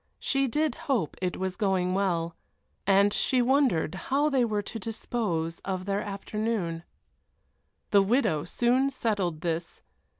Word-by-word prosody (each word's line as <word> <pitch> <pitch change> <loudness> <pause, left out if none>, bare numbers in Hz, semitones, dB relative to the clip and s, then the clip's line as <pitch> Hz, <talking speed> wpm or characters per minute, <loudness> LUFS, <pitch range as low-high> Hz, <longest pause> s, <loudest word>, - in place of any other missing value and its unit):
She 275 0 +1
did 300 +2 +1 0.2
hope 225 - +1
it 180 -1 -1
was 190 0 -2
going 190 -4 +1
well. 170 -4 0 0.5
And 200 +1 +5
she 255 - +1
wondered 245 - +2 0.2
how 285 +3 +3
they 265 -3 +3
were 210 -3 0
to 225 - -6
dispose 190 -7 -2
of 185 -1 -4
their 200 +1 0
afternoon. 200 -4 -2 1.1
The 200 - +6
widow 195 - +2
soon 245 +8 +2
settled 200 - -1
this. 170 0 -3
200 Hz, 135 wpm, -28 LUFS, 180-240 Hz, 1.1 s, The